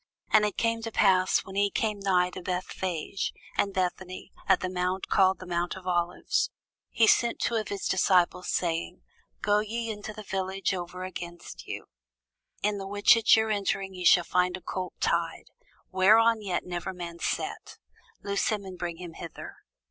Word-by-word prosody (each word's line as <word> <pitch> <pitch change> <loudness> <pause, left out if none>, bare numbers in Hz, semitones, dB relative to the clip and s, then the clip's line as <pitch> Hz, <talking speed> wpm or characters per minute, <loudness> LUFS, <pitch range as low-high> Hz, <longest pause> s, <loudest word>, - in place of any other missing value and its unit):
And 215 -1 +6
it 205 - -6
came 230 0 +1
to 225 0 -5
pass, 185 -3 +3
when 190 - -9
he 200 0 +2
was - - +2
come 215 -2 -1
nigh 180 -2 +2
to 185 - -7
Bethphage 180 0 -3 0.2
and 200 - +1
Bethany, 185 0 -3 0.2
at - - +5
the 185 - -1
mount 180 +1 -2
called 190 -1 +4
the 185 - -10
mount 175 0 -1
of 185 - -12
Olives, 175 -1 0 0.4
he 230 - +4
sent 235 +1 +3
two - - 0
of 220 -3 0
his 200 - -3
disciples, 180 -1 +2
saying, 165 - -2 0.4
Go 205 0 +4
ye 225 +2 -3
into 210 0 -6
the 215 0 -9
village 190 0 -2
over 180 0 -5
against 175 - -8
you; - - -5 0.8
in 210 -1 +1
the 195 - -5
which 205 +3 +5
at 230 -1 +6
your 220 0 +1
entering 195 -1 -1
ye 180 -1 -6
shall 175 0 +6
find 180 +1 +1
a - - -14
colt 185 0 -5
tied, - - -1 0.4
whereon 220 +4 +5
yet 185 -4 -2
never 180 +1 -4
man 170 -1 -7
sat: - - -3 0.5
loose 200 0 0
him, 210 -3 -1
and 185 -2 -9
bring 170 -1 -3
him 175 -2 -8
hither. 165 0 -9
190 Hz, 180 wpm, -28 LUFS, 180-205 Hz, 0.8 s, And